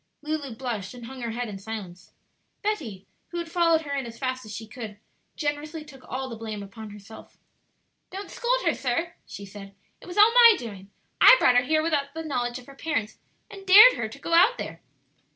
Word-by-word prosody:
Lulu 295 -5 -4
blushed 230 -4 -5
and 240 -1 -10
hung 260 +1 -9
her 235 - -3
head 240 +2 -4
in 200 -2 -7
silence. 195 -4 -8 0.5
Betty, 245 - -3 0.2
who 345 - -7
had 340 -1 -5
followed 335 -2 +3
her 285 -3 -6
in 270 -3 -3
as 230 0 -10
fast 255 0 -3
as 215 - -11
she 215 +2 -7
could, 220 -2 -9 0.4
generously 300 +1 -4
took 270 -4 -15
all 260 +1 -4
the 235 - -7
blame 215 -2 -6
upon 215 +2 -10
herself. 205 +1 -13 0.7
"Don't 390 +1 -8
scold - - 0
her, - - +3
sir," 305 +7 -2
she 200 - -9
said; 195 0 -12 0.3
"it - - -14
was 355 - -8
all 425 +3 +7
my 470 -2 +8
doing. 200 -5 -9 0.3
I - - +10
brought 250 - +4
her 245 - +6
here 310 +2 +1
without 290 -3 -1
the 325 - -4
knowledge 245 -5 -2
of 250 - -12
her 275 - -13
parents, 275 -7 -3 0.3
and 395 -2 -10
dared 430 +7 +10
her - - -4
to - - -11
go 335 - -5
out 390 +9 +5
there." - - -7
260 Hz, 210 wpm, -25 LUFS, 220-330 Hz, 0.7 s, I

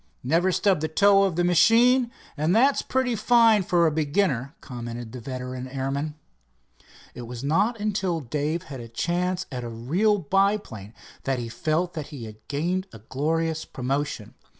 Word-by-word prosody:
"Never 165 +8 +2
stubbed 190 -3 +2
the 155 - 0
toe 195 +4 +4
of 185 -4 -1
the 175 - +1
machine, 235 +8 +5 0.3
and 160 +5 +1
that's 270 +5 +4
pretty 260 -2 0
fine 225 -1 +5
for 175 -2 +2
a 160 - +3
beginner," 150 -2 0
commented 120 -2 -7
the 125 - -7
veteran 130 +1 -6
airman. 140 +3 -3 1.0
It 120 -1 -8
was 120 +1 -7
not 200 - +1
until 195 -5 -1
Dave 150 +4 -2
had 135 -3 -8
a 115 - -8
chance 180 +9 -1
at 125 -2 -4
a 120 - -5
real 165 - +1
biplane 190 - -1 0.3
that 135 -1 0
he 120 -1 -4
felt 160 +8 -1
that 155 -3 -5
he 135 -7 -8
had 110 -1 -10
gained 175 +7 -1
a - - -10
glorious 160 +8 -2
promotion. 135 +3 -3
155 Hz, 165 wpm, -25 LUFS, 130-195 Hz, 1.0 s, machine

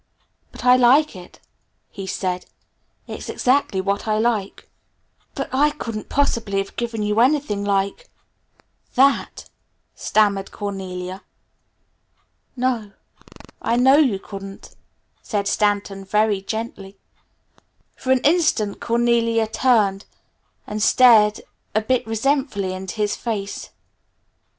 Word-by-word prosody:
"But - - -10
I 250 0 +7
like 260 +3 +4
it," 180 -1 -13 0.5
he 195 -1 -7
said. 180 -1 -3 0.6
"It's - - -8
exactly 255 -6 +1
what 200 +3 -2
I 215 0 +1
like." 220 -3 -1 0.7
"But - - -3
I 290 +3 +4
couldn't 230 -8 -6
possibly 230 -8 0
have 195 0 -3
given 230 -2 -3
you 210 +1 0
anything 250 -5 +2
like 200 - -1 0.9
that," 275 +1 +2 0.5
stammered 200 -2 +1
Cornelia. 190 -2 -6 1.3
"No, 245 -5 -1 0.7
I 230 - 0
know 260 +3 +5
you 260 -10 +3
couldn't," 195 0 -10 0.5
said 200 -2 -2
Stanton 200 -2 0
very 210 0 +1
gently. 205 -2 -6 1.0
For 260 - -3
an 260 -1 +3
instant 295 - +1
Cornelia 230 -1 +2
turned 215 -4 +1 0.6
and 210 0 -5
stared 220 -3 +5 0.3
a 215 - +3
bit 245 +1 0
resentfully 225 -4 -1
into 185 -1 -6
his 210 -1 0
face. 205 -4 -5
215 Hz, 110 wpm, -21 LUFS, 200-245 Hz, 1.3 s, I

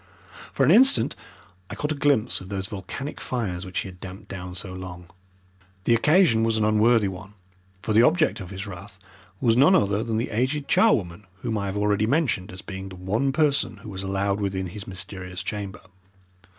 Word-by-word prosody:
For 135 - +1
an 145 - +5
instant 220 - +5 0.5
I - - -6
caught 150 +1 -2
a - - +2
glimpse 140 -5 +2
of 95 - -10
those 95 -1 -3
volcanic 110 +8 -6
fires 100 -8 -3
which 90 - -2
he - - -6
had 90 -1 -11
damped 95 +3 -10
down 90 -1 -7
so 95 +1 -5
long. 90 -1 -9 0.7
The 115 - +3
occasion 150 -1 +4
was 115 -1 +2
an 110 - +2
unworthy 110 0 +4
one, 95 +2 -8 0.5
for 110 - -1
the 110 - +6
object 155 -4 +3
of 90 -3 -8
his 95 +1 -6
wrath 100 +1 -10 0.4
was 115 -2 +3
none 145 +10 +6
other 100 - +2
than 115 -2 -2
the 115 - -2
aged 130 +6 -1
charwoman 105 - +2 0.2
whom 115 - -1
I 100 -2 -2
have 95 +1 -3
already 105 +1 +1
mentioned 125 - 0
as 95 0 -10
being 95 -1 -7
the 95 - -10
one 105 +9 0
person 140 -7 +1
who 110 - -8
was 95 -2 -6
allowed 100 +1 -1
within 95 -1 -2
his 100 +3 -9
mysterious 90 -1 -5
chamber. 100 0 -5
105 Hz, 195 wpm, -25 LUFS, 95-120 Hz, 0.7 s, the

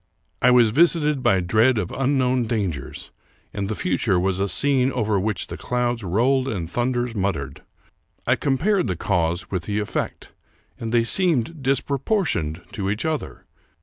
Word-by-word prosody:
I 125 - +5
was 120 -3 +5
visited 150 0 +3
by 115 -7 +3
dread 110 +8 +3
of 95 -5 -2
unknown 130 -2 +1
dangers, 100 -10 -4 0.4
and 100 -1 -3
the 110 - -2
future 90 +1 0
was 95 +1 0
a 100 +1 0
scene 135 0 +2
over 110 -5 0
which 105 +1 -1
clouds 120 -2 -2
rolled 125 +8 +1
and 95 -10 -3
thun 120 +8 -1
ders 120 -1 -2
muttered. 90 - -3 0.6
I - - +3
compared 180 - +1
the 90 - -1
cause 85 -1 -1
with 90 -3 -2
the 105 -1 -2
efifect, 105 -1 -3 0.5
and 115 -1 -4
they 120 -1 +3
seemed 160 0 0
disproportioned 135 - -1
to 100 -5 -3
each 105 +7 -2
other. 160 -2 -4
115 Hz, 155 wpm, -23 LUFS, 95-130 Hz, 0.6 s, I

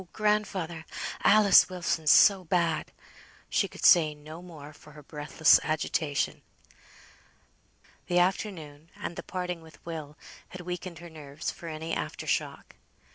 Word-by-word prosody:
grandfather! 200 -6 -1 0.4
Alice 205 -3 +6
Wilson's 170 -4 -1
so 195 +2 +6
bad!" 170 -2 0 0.6
She - - +2
could - - -6
say 155 -3 +6
no 155 +3 -11
more, 155 -4 -12
for 150 +1 -17
her 150 0 -13
breathless 150 +2 +3
agitation. 155 -1 -1 1.7
The 175 - 0
afternoon, 170 -5 -1
and 170 - -6
the - - -5
parting 180 -2 -5
with 160 -2 -16
Will, 155 -3 -7 0.3
had 185 - -9
weakened 180 0 -6
her 170 +1 -11
nerves 150 0 -6
for 170 - -11
any 160 +1 -5
after - - -4
shock. - - -3
165 Hz, 130 wpm, -28 LUFS, 155-180 Hz, 1.7 s, Alice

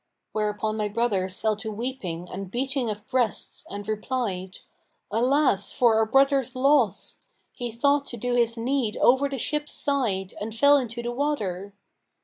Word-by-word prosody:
Whereupon 215 0 -1
my 210 -1 0
brothers 200 -4 -1
fell 220 -1 +1
to 220 0 -4
weeping 205 -7 -4
and 190 +1 -6
beating 260 +2 -1
of 210 0 -6
breasts 245 -4 -1
and 205 0 -7
replied, 215 -4 -3 0.5
'Alas, 245 -2 +2
for 240 -4 +4
our 220 0 +3
brother's 270 +1 +3
loss! 270 -4 +2 0.3
He 240 -1 -5
thought 280 +5 +2
to 240 - -4
do 245 +2 -2
his 235 -1 +2
need 240 -2 0
over 265 +3 +4
the 275 - -3
ship's 295 +4 -1
side[FN#532] 215 -10 0
and 215 +1 -4
fell 285 +5 +6
into 235 -3 -3
the 240 - -2
water!' 205 -9 -2
235 Hz, 155 wpm, -26 LUFS, 210-265 Hz, 0.5 s, fell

